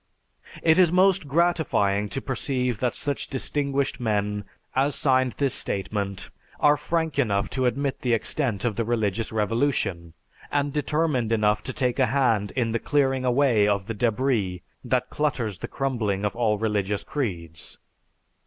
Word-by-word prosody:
It 160 +1 +5
is 175 -3 +5
most 185 -3 +3
gratifying 140 - +1
to 135 - -3
perceive 125 -3 -1
that 125 -1 0
such 145 -1 -2
distinguished 140 0 -1
men 105 -3 -1 0.3
as 135 +2 +2
signed 130 -3 +2
this 135 +4 0
statement 100 -1 -3 0.3
are 150 0 +5
frank 160 0 -1
enough 100 -6 +1
to 130 -1 +1
admit 135 +2 -1
the 125 -2 +1
extent 115 -2 -1
of 110 -4 -1
the 115 - +1
religious 110 -2 -1
revolution, 105 - 0 0.4
and 145 -1 0
determined 150 -5 0
enough 105 -1 +2
to - - -2
take 125 -2 -1
a 130 - +4
hand 115 -5 +2
in 120 -3 0
the 115 - 0
clearing 135 -2 +1
away 125 -5 +3
of 100 -2 +1
the 115 - -4
débris 110 -5 0 0.2
that - - 0
clutters 120 - -1
the - - -5
crumbling 110 -7 -1
of 105 - -2
all 110 -3 +1
religious 105 -2 -1
creeds. 85 - -4
120 Hz, 155 wpm, -25 LUFS, 105-140 Hz, 0.4 s, It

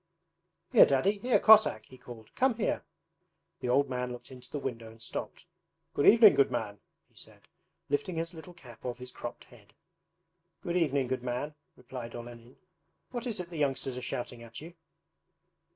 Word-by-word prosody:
'Here - - +8
Daddy, 190 +10 +2
here 245 +3 +3
Cossack!' 215 - +6
he 130 - -15
called. 115 -3 -12
'Come 260 -2 +2
here!' 220 - -1 0.8
The 125 - -3
old 140 +3 +3
man 125 -1 -3
looked 125 +2 -9
into 125 -1 -11
the - - -4
window 115 -5 -5
and 115 +1 -16
stopped. 110 - -6 0.5
'Good 145 - +2
evening, 225 -1 +9
good 140 - +4
man,' 100 0 -3 0.3
he - - -36
said, - - -12 0.5
lifting 145 +5 -1
his 165 +1 -3
little 170 +2 -11
cap 125 -9 -15
off 125 -1 -4
his 125 0 -10
cropped - - -7
head. - - -20 0.9
'Good 175 -2 -2
evening, 145 -6 +2
good 130 0 -2
man,' 125 +5 -3 0.2
replied 125 -2 -8
Olenin. 120 +1 -10 0.5
'What 245 -1 -4
is 225 -5 -2
it 175 -1 -6
the 165 - -6
youngsters 135 -2 -1
are 125 - -5
shouting 120 -1 -5
at 115 -1 -9
you?' 165 +3 -10
130 Hz, 175 wpm, -30 LUFS, 120-170 Hz, 0.9 s, evening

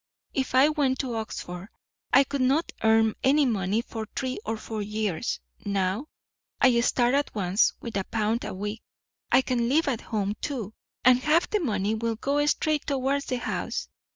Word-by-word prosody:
If 265 -1 -1
I 265 +3 +7
went 285 -4 +1
to 255 -3 -4
Oxford 195 -4 -5 0.4
I 275 - +7
could 275 0 -3
not 275 +6 +2
earn 220 -1 +4
any 285 +2 +4
money 210 -1 0
for 220 -3 -6
three 260 -1 -2
or 225 0 -1
four 215 0 -5
years; 210 -4 -2 0.2
now 200 +6 -1 0.5
I 255 -3 +5
start 240 +1 +2
at 285 -3 0
once 195 0 +2
with 230 -3 -6
a 195 - 0
pound 225 +1 -1
a - - -4
week. 210 +3 -4 0.5
I 265 - +5
can 240 -2 0
live 310 +4 +3
at 250 -5 0
home, 205 -3 -2
too, 230 -8 -4 0.3
and 250 0 +7
half 305 +6 +2
the 425 - +2
money 210 - 0
will 225 +1 -1
go 280 +6 0
straight 305 0 +1
towards 275 +1 0
the 255 - -2
house. - - -3
235 Hz, 180 wpm, -26 LUFS, 215-270 Hz, 0.5 s, I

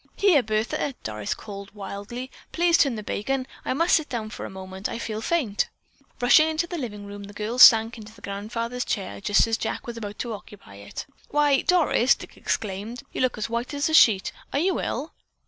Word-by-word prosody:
"Here, 370 -9 +5
Bertha!" 220 +5 -1
Doris 105 -1 -3
called 200 -1 -9
wildly. 205 +6 -6 0.2
"Please 340 0 +3
turn 275 -7 +3
the 215 - -5
bacon. 260 +6 -2 0.2
I - - -1
must 335 +4 +4
sit 315 - 0
down 220 -4 -4
for - - -6
a - - -9
moment. 190 +1 -6
I - - -4
feel 220 -2 -4
faint!" 240 -8 0 0.5
Rushing 275 +6 +6
into 320 +2 0
the 345 -1 -5
living 210 -6 -6
room, 200 0 -8
the 205 +1 -12
girl 220 +4 -3
sank 225 -1 +8
into 215 0 -11
the 225 - -19
grandfather's 230 +5 -3
chair 100 - -3
just 205 - +4
as 225 0 -1
Jack - - -3
was 235 -1 -6
about 205 -2 -6
to 235 -2 -3
occupy 200 - -11
it. 100 - -7 0.2
"Why, 290 -2 +3
Doris," 315 -8 +4
Dick - - -12
exclaimed, 215 +4 -3
"you - - -2
look 255 -1 +1
as 215 - -2
white 235 +4 -3
as 285 +2 +1
a - - -2
sheet! 205 - +6 0.2
Are - - 0
you 365 +4 +1
ill?" 290 +7 -3
230 Hz, 205 wpm, -25 LUFS, 205-270 Hz, 0.5 s, sank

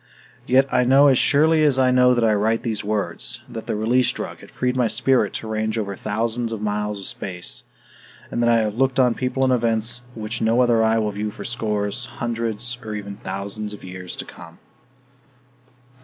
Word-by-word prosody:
Yet 130 +2 +4
I - - +4
know 135 +3 +6
as 130 - +4
surely 155 +2 +4
as 145 -3 +3
I 130 -1 +4
know 125 0 +5
that 120 - +1
I 110 -1 +4
write 110 +2 +1
these 110 -3 -2
words 95 - -2
that 115 - -8
the - - -1
Release 120 +4 +2
Drug - - -6
had - - -14
freed 125 0 -1
my 125 -2 +2
spirit 120 0 +2
to 110 - -5
range 110 +1 -1
over 100 -3 -3
thousands 115 +4 -2
of 110 - -4
miles 105 0 -2
of 95 - -8
space, 90 -10 -4 0.7
and 120 - -1
that 120 - +3
I 115 -1 +4
have 105 -1 -1
looked 135 0 +2
on 125 -2 +4
people 130 +2 -1
and 130 -1 +3
events 115 0 0
which 110 +1 -4
no 115 +3 +3
other 120 -2 +3
eye 110 0 +3
will 105 -1 0
view 105 +1 -3
for 105 - -9
scores, 110 -1 -2
hundreds 115 +1 -3
or 110 -1 -5
even 100 -1 -6
thousands 100 +2 -4
of 105 - -11
years 90 -1 -7
to - - -6
come. - - -13
115 Hz, 200 wpm, -22 LUFS, 105-125 Hz, 0.7 s, know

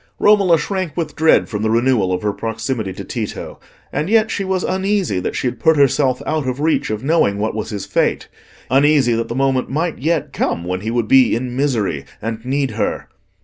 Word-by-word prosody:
Romola 200 -5 +4
shrank 185 -2 -3
with 160 -3 -3
dread 160 +1 +4
from 105 -3 -4
the 110 - 0
renewal 115 -4 +2
of 90 +1 -2
her 105 -1 0
proximity 110 -1 -3
to - - -7
Tito, - - -6 0.3
and 150 +5 -1
yet 220 0 +3
she 200 - -2
was 190 -1 -1
uneasy 190 - 0
that - - -3
she - - -2
had 125 -2 -2
put 160 +5 +3
herself 135 -2 +2
out 155 -4 -1
of 130 +1 -2
reach 155 +2 +1
of 110 +1 -3
knowing 135 -10 +2
what 110 +2 -1
was 110 -1 -4
his 100 -3 -5
fate—uneasy 135 -2 0
that 115 0 -1
the 115 - -5
moment 135 -1 +1
might 160 +4 -2
yet 160 +4 -1
come 85 - -1
when 90 +1 -3
he 110 - -3
would 115 -1 -1
be 130 -2 +5
in 125 +1 -4
misery 115 - 0 0.2
and 115 0 -5
need 135 +1 -1
her. - - -3
130 Hz, 205 wpm, -18 LUFS, 110-155 Hz, 0.3 s, be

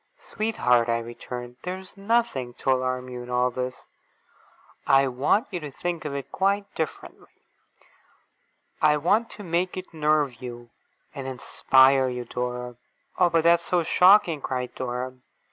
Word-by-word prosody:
'Sweetheart!' 125 - +1
I 115 - +2
returned; 120 +1 -7
'there 180 +1 -4
is 190 -1 -14
nothing 200 - 0
to 135 - 0
alarm 130 0 -1
you 125 -1 -7
in 120 - -10
all 125 0 +1
this. 125 +1 -5 1.0
I 135 0 +5
want 135 - +1
you 180 - -3
to 150 -3 -7
think 170 +4 -4
of 140 -2 -3
it 140 - -6
quite 200 +1 +1
differently. 160 -2 -7 1.4
I 150 -1 +4
want 215 +10 +1
to 210 - -10
make 180 +1 -1
it 185 -1 -8
nerve 150 -5 +1
you, 120 -1 -9 0.4
and 135 -1 -6
inspire 130 +1 +3
you, 125 -1 -5
Dora!' 125 0 -4 0.4
'Oh, 175 - +5
but 165 -1 +2
that's 170 0 +4
so 175 -2 +1
shocking!' 180 -2 +5
cried 125 -2 -3
Dora. 125 0 -4
135 Hz, 150 wpm, -25 LUFS, 125-175 Hz, 1.4 s, I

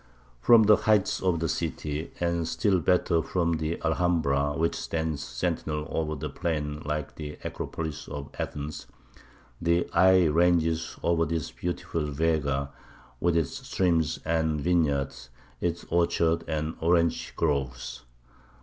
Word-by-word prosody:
From 115 - +7
the 105 0 +6
heights 105 -2 +2
of 90 -3 +1
the 80 - 0
city, 75 +1 -3
and 85 -1 0
still 95 +1 +2
better 85 0 +2
from 85 -1 0
the 80 +1 -2
Alhambra, 80 -4 +1
which 85 +1 +1
stands 80 -3 -2
sentinel 75 0 -2
over 80 -1 -1
the 70 - -4
plain 75 -4 -2
like 75 0 -3
the 75 -1 -6
Acropolis 80 -3 -5
of 70 -1 -7
Athens, 75 +1 -5 0.7
the 85 +1 +2
eye 95 +1 +6
ranges 80 0 +2
over 85 -1 +2
this 80 -1 -2
beautiful 85 -3 -3
Vega, 70 -2 0 0.5
with 85 -1 +2
its 80 -4 0 0.2
streams 80 -4 +1
and 80 -1 +1
vineyards, 70 -6 0 0.3
its 85 0 -2
orchards 85 -1 +2
and 80 0 -2
orange 85 0 +1
groves. 65 -6 -2
80 Hz, 130 wpm, -27 LUFS, 75-85 Hz, 0.7 s, From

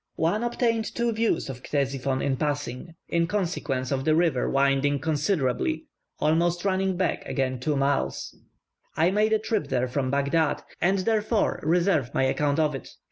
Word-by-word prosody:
One 175 +8 0
obtained 235 -2 0
two 235 0 +1
views 225 0 0
of 130 -2 -7
Ctesiphon 135 -2 -1
in 135 -1 +1
passing, 145 +2 -3
in 170 0 +1
consequence 165 -9 -2
of 135 -1 0
the 155 +2 +3
river 160 -6 +2
winding 140 +1 +2
considerably 155 - 0 0.3
almost 170 +3 +1
running 190 -1 +1
back 185 - 0
again 130 -2 -1
several 145 +2 0
miles. 140 0 -1 0.6
I 165 +3 +3
made 210 +2 +2
a 220 - +5
trip 215 -1 -2
there 130 -1 0
from 130 +1 -1
Baghdad, 140 +3 +1 0.2
and 190 +3 +3
therefore 215 +2 +1
reserve 165 -5 +1
my - - +2
account 145 +2 +1
of 155 -2 +2
it. 135 - -7
155 Hz, 160 wpm, -26 LUFS, 135-190 Hz, 0.6 s, a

